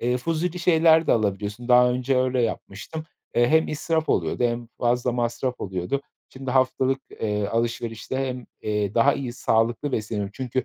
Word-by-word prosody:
eee, 125 +1 +1
fuzuli 165 +5 -2
şeyler 165 -2 +4
de - - +4
alabiliyorsun. 105 +2 -1
Daha 125 0 +6
önce 125 +1 0
öyle 130 -1 +1
yapmıştım. 115 +8 -4 0.3
Eee, 120 0 +4
hem 160 +3 +3
israf 160 +1 -1
oluyordu 85 +8 +1
hem 120 0 -1
fazla 120 +1 +1
masraf 120 +1 -2
oluyordu. 95 +8 -2 0.3
Şimdi 135 -1 -6
haftalık, 130 +1 +2
eee, 105 -2 -2
alışverişte 115 +2 -2
hem, 125 -1 -6 0.2
eee, 105 -2 -1
daha 125 +5 +5
iyi 125 -3 -4
sağlıklı 120 +3 0
besleniyorum. 105 -2 -2
Çünkü 130 0 -2
125 Hz, 160 wpm, -24 LUFS, 115-135 Hz, 0.3 s, Daha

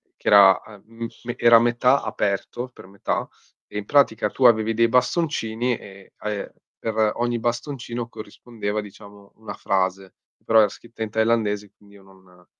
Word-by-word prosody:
che - - -13
era 100 -2 +7
a 105 - -14
mhmm, 115 +1 -8 0.2
me 120 - -4
che - - -8
era 115 0 +9
a - - +6
metà 120 +3 +2
aperto, 105 +5 -3
per 120 - -15
metà, 100 0 -3 0.4
e - - -8
in 105 - -4
pratica 110 -6 +2
tu 130 - -1
avevi 115 -1 +4
dei 115 +1 +3
bastoncini 125 -2 0
e, 95 -1 -15
ehm, 105 -1 -4 0.3
per 110 -1 0
ogni 120 0 -1
bastoncino 120 0 -4
corrispondeva 110 -1 -6
diciamo 100 0 -14
una 105 -2 -9
frase. 95 -1 -2 0.3
Però 115 0 +5
era 105 - +5
scritta 115 +2 -9
in 110 - -4
thailandese, 110 -2 0
quindi 100 0 -21
io 100 - -17
non 95 -2 -21
110 Hz, 170 wpm, -23 LUFS, 100-120 Hz, 0.4 s, era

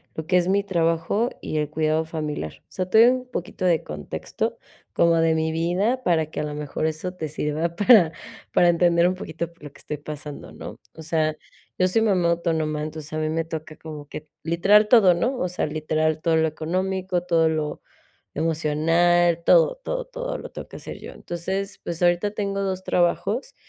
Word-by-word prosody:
lo 160 -1 -5
que 180 - +2
es, 175 -1 +2
mi 200 +1 +2
trabajo 170 +4 +1
y 155 - -3
el 150 -1 -1
cuidado 155 +1 +1
familiar. 150 - -4
O - - -50
sea, 185 -1 -3
te 220 - +5
doy 245 - +6
un 255 - -9
poquito 185 0 -5
de 170 -3 +3
contexto 75 -1 -4 0.3
como 170 0 +3
de 165 0 +3
mi 160 0 0
vida, 185 +10 0
para 165 -5 +2
que - - -6
a - - -2
lo 150 0 -4
mejor 150 +1 -3
eso 160 +4 -4
te 160 -4 -5
sirva 155 +3 -2
para 200 -4 +6 0.4
para 175 - +4
entender 170 0 +4
un 185 - 0
poquito 170 -2 -5
por 170 -2 -23
lo 145 - -8
que - - -17
estoy 150 - -5
pasando, 150 0 -8
¿no? - - -9 0.2
O - - -11
sea, 155 -1 0 0.4
yo 185 - +4
soy 205 +5 +2
mamá 190 -6 +2
autónoma, 160 -3 -1
entonces 155 0 -7
a - - -2
mí 155 0 -1
me 165 +1 0
toca 155 -1 -6
como 150 -2 -9
que, 150 +1 -8 0.2
literal 195 +6 +4
todo, 215 -7 +7
¿no? 245 +10 0
O 180 - 0
sea, 180 - -1
literal 155 0 -1
todo 165 0 +2
lo 160 0 +3
económico, 185 +3 -2
todo 165 -2 +3
lo 155 -1 -2 0.5
emocional, 165 +2 +2
todo, - - +5
todo, - - -3
todo - - -5
lo - - -8
tengo - - -8
que - - -13
hacer - - -8
yo. - - -9
Entonces, 190 +3 -4
pues, 170 0 -5
ahorita 175 +4 +2
tengo 200 -1 -2
2 190 -1 -2
trabajos 190 +8 0
170 Hz, 200 wpm, -24 LUFS, 155-185 Hz, 0.5 s, todo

